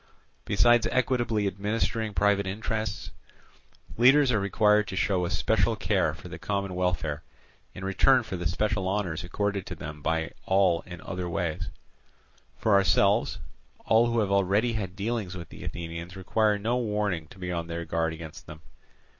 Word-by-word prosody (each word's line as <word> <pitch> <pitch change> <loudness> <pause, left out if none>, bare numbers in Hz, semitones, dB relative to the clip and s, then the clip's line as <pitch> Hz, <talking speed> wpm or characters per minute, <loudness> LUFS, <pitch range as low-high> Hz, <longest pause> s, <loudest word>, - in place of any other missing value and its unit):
Besides 115 +4 +4
equitably 120 -5 +1
administering 105 +2 -1
private 100 -1 +2
interests, 110 +1 -3 0.9
leaders 135 +2 +6
are 110 - +2
required 105 +1 +3
to 95 - -5
show 95 -2 +1
a - - -2
special - - +1
care - - 0
for - - -11
the - - -8
common 100 -2 -2
welfare 90 -5 -1 0.5
in 95 - -6
return 125 +6 +4
for 100 - -5
the 90 -1 -2
special 95 +2 0
honours 95 -4 -2
accorded 100 +2 -2
to - - -5
them 75 0 -8
by 80 +1 -1 0.2
all 95 -3 +3
in 90 -1 -9
other 90 -2 -4
ways. 85 -2 -2 0.9
For 110 - +1
ourselves, 100 +3 +3 0.5
all 115 +2 +4
who 115 -1 +1
have 100 -2 -1
already 100 +4 +2
had 95 -5 -4
dealings 100 -3 -3
with 85 -2 -9
the - - -11
Athenians 85 +1 -6
require 105 +2 +1
no 115 +4 0
warning 105 -8 -1
to - - -15
be 90 -1 -4
on 85 -1 -3
their 85 0 -4
guard 80 0 0
against 80 -1 -9
them. 75 +1 -10
100 Hz, 165 wpm, -27 LUFS, 90-110 Hz, 0.9 s, leaders